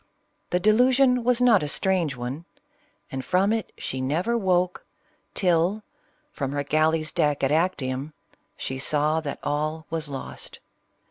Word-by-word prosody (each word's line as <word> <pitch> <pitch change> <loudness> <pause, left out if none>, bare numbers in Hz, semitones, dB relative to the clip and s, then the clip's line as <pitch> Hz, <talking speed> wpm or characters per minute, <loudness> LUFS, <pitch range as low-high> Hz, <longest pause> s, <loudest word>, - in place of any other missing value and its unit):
The 180 - +1
delusion 250 +5 +4
was 245 0 +3
not 240 -5 +5
a 150 - -2
strange 175 -2 +1
one; 130 +7 -5 0.7
and 130 0 -4
from 190 +6 +2
it 225 -1 -3
she 130 - -4
never 165 - 0
woke, 180 -4 +1 0.5
till 180 +3 +1 0.5
from 135 - -3
her 145 0 -1
galley's 155 +1 +1
deck 145 -2 +1
at 135 - +2
Actium, 150 -4 -1 0.4
she 130 0 -4
saw 150 +3 +1
that 145 -3 -5
all 155 +2 -2
was 160 -2 -2
lost. 135 -1 -6
160 Hz, 140 wpm, -25 LUFS, 145-190 Hz, 0.7 s, not